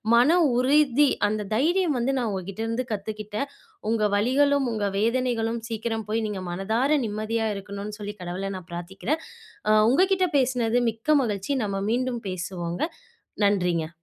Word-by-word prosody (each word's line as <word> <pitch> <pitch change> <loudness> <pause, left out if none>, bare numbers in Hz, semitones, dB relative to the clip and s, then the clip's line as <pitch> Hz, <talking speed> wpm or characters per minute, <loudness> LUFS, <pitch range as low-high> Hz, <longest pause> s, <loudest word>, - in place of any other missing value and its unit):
மன 270 +9 +5 0.2
உறுதி, 280 +1 +4 0.2
அந்த 210 0 -2
தைரியம் 325 +3 +2
வந்து 255 +3 +1
நான் 235 -3 0
உங்ககிட்டேருந்து 220 +6 -3
கத்துக்கிட்டேன். 215 +4 -4 0.4
உங்க 225 -2 +1
வலிகளும், 275 +5 +3
உங்க 210 -2 0
வேதனைகளும் 235 0 0
சீக்கிரம் 225 -1 -3
போய், 225 +1 0
நீங்க 205 -3 -4
மனதார 225 +11 +1
நிம்மதியா 220 +1 -1
இருக்கணும்ன்னு 200 +2 -7
சொல்லி 205 0 -5
கடவுள 185 +3 -4
நான் 180 -1 -12
பிரார்த்திக்கிறேன். 190 - -3 0.5
அ 215 0 +6
உங்க 355 +9 +5
கிட்ட 375 -1 +2
பேசினது 245 -3 +1
மிக்க 225 +8 +1
மகிழ்ச்சி. 205 +1 -2
நம்ம 195 -1 -2
மீண்டும் 245 0 -1
பேசுவோங்க. 175 -1 -4 0.6
நன்றிங்க. 180 -5 +1
225 Hz, 135 wpm, -25 LUFS, 200-255 Hz, 0.6 s, அ